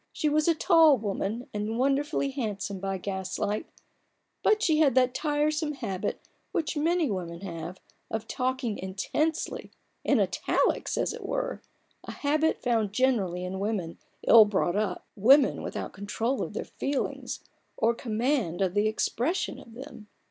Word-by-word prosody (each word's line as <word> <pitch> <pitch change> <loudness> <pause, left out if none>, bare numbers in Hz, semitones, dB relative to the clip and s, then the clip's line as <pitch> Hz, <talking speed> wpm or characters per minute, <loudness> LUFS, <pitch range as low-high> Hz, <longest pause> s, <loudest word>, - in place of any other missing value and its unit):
She 305 - 0
was 305 +2 +2
a 335 - +4
tall 320 -4 +6
woman, 215 +2 -3
and 210 +2 -2
wonderfully 275 +2 +1
handsome 205 -7 -3
by 195 0 -2
gaslight; 190 - -3 0.7
but 430 0 +3
she 315 -3 +3
had 285 -6 +4
that 255 -1 +4
tiresome 300 +1 0
habit, 200 -9 -3 0.3
which 320 -2 -1
many 320 -2 +1
women 170 -3 -4
have, 175 -1 -6 0.3
of 220 0 -3
talking 255 -4 -2
intensely 205 +12 -2 0.2
— - - -45
in - - +3
italics, - - +1
as - - 0
it - - -8
were: - - -2 0.4
a - - -7
habit 305 +2 +1
found 225 -5 +1
generally 200 -8 +1
in 190 +1 -4
women 195 -5 -2 0.3
ill 225 -2 +9
brought 195 -3 0
up— 205 -3 -1
women 260 +7 +5
without - - -5
control 225 +6 -2
of - - -4
their - - -4
feelings, 275 -1 -3 0.4
or 230 +1 +3
command 230 - -1
of 185 -2 0
the 205 +1 +2
expression 255 +10 -1
of 230 - -14
them. 250 -4 -10
230 Hz, 150 wpm, -28 LUFS, 200-295 Hz, 0.7 s, ill